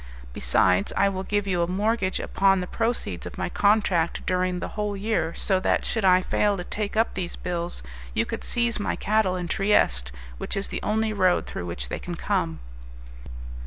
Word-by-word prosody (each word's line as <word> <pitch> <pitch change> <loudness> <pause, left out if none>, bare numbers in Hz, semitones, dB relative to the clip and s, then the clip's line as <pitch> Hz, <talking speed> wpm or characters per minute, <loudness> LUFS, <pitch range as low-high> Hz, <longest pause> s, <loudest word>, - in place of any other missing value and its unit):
Besides, 90 +11 +2
I 200 - +4
will 190 -1 -3
give 205 +1 -1
you 180 -3 0
a 170 - +1
mortgage 195 +1 0
upon 195 0 +2
the 180 - -2
proceeds 230 +5 -2
of - - -9
my - - -2
contract 200 -5 +2
during 185 0 0
the - - -4
whole 210 -1 -3
year, 195 -5 -1
so 190 -2 +1
that, - - +1
should 225 - -1
I 185 -1 +5
fail 205 +1 +1
to 180 - -4
take 210 +3 -4
up 225 - +2
these 180 -2 -3
bills, 175 - -4 0.3
you - - +2
could - - -5
seize 235 -2 +1
my 205 - -1
cattle 210 -3 +1
in 180 -1 -3
Trieste, 60 - +2 0.3
which - - -3
is 195 - -2
the - - -4
only 220 0 0
road 185 -3 +2
through 90 - -6
which - - -5
they - - -3
can - - -5
come." 80 -3 -1
190 Hz, 195 wpm, -25 LUFS, 175-210 Hz, 0.3 s, I